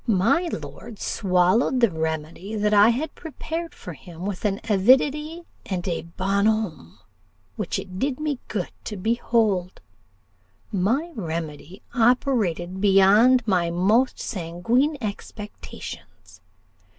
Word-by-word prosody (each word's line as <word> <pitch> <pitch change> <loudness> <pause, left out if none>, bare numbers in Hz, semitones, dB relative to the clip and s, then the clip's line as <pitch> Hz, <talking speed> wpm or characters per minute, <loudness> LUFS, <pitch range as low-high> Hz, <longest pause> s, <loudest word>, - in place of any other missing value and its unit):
My 230 - +2
lord 220 - -7
swallowed 190 +8 +2
the 235 -5 +4
remedy 160 +5 -4
that 210 0 +1
I 205 +2 +7
had 285 +6 -1
prepared 325 +1 -6
for 180 - -8
him 170 +4 -10
with 200 0 -4
an 200 0 0
avidity 275 - +3 0.2
and 185 -1 -3
a 170 - -1 0.2
bonhommie 200 - 0 0.6
which - - -2
it 185 -1 -7
did 270 +2 -1
me 300 -4 -2
good 195 -5 -3
to 210 - -5
behold; 215 -3 0 0.9
my 235 - 0
remedy 165 - -6
operated 225 -8 +1
beyond 210 +5 +5
my 180 -4 +2
most 205 +9 +2
sanguine 230 - 0
expectations. 200 - -8
205 Hz, 115 wpm, -24 LUFS, 180-245 Hz, 0.9 s, I